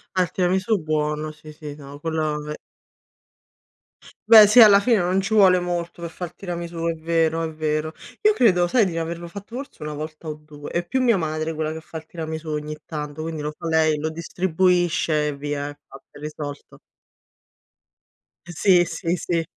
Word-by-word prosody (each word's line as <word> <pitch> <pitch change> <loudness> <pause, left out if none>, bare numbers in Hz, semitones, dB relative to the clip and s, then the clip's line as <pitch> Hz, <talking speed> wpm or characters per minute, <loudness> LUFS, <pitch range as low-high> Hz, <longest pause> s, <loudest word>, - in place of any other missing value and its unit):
Ah, 185 - +4
il 180 - -5
tiramisù 190 +4 +1
buono, 155 0 -1
sì, 155 0 -13
sì, 150 -1 -8
no, 140 -1 -11
quello 155 -1 -1
ve 150 0 -6 1.7
Beh 220 -2 +10
sì, 235 +4 +7
alla 205 -3 +9
fine 230 +2 +3
non 180 +2 +1
ci 195 +3 -2
vuole 190 -4 +6
molto 175 -1 -4
per 170 - -4
far 175 -1 -7
tiramisù, 170 -2 -5
è 165 - +1
vero, 165 0 0
è 160 - -3
vero. 155 0 -2 0.3
Io 425 -1 +5
credo, 180 - +3
sai, 225 +1 +3
di 180 - -3
n 165 - -2
averlo 170 +1 -5
fatto 200 +5 -10
forse 275 - -8
1 150 0 -4
volta 155 +2 -7
o 155 - -4
2. 150 -1 -11
È 175 0 -2
più 260 +8 0
mia 235 -5 +4
madre 155 0 -2
quella 155 0 -2
che 160 - -7
fa 160 - -9
il 160 - -9
tiramisù 160 -1 -6
ogni 150 0 -4
tanto, 150 -1 -5
quindi 160 -1 -4
lo 150 +1 -3
fa 165 +2 -8
lei, 160 -1 +3
lo 155 +2 -2
distribuisce 170 -2 +1
e 145 - -4
via. 145 0 -3
È 145 - -11
fatta, 135 - -14
è - - -14
risolto. 150 -1 -7 1.7
Sì, 175 +1 +4
sì, 170 0 -2
sì. 170 -1 -1
165 Hz, 190 wpm, -23 LUFS, 155-180 Hz, 1.7 s, Beh